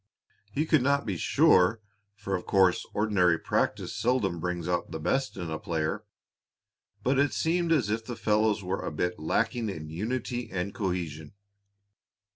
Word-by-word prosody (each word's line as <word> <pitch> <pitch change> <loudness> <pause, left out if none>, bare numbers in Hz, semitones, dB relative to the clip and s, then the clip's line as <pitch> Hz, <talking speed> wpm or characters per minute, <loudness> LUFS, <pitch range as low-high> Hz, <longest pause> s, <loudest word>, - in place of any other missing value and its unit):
He 150 +9 0
could 155 -3 +3
not 140 +2 +2
be 100 - -1
quite 85 - -5
sure, 90 +5 +4 0.4
for 100 -2 -3
of 90 - -5
course 95 -2 +3
ordinary 95 -5 +2
practice - - -1
seldom 110 -8 0
brings 90 0 -3
out 90 -1 -1
the 80 - -5
best 135 - -1
in 85 -3 -4
a 80 - -3
player, 85 +6 -2 1.0
but 130 +4 +2
it 145 0 +2
seemed 170 +1 +1
as 140 -10 +3
if 110 +1 -1
the 120 - -5
fellows 105 -1 +1
were 95 +1 -2
a - - -2
bit 90 +3 -2
lacking 115 +8 0
in 80 -5 -6
unity 120 +5 -3
and 95 +1 -3
cohesion. 85 -6 -3
100 Hz, 165 wpm, -28 LUFS, 90-120 Hz, 1.0 s, sure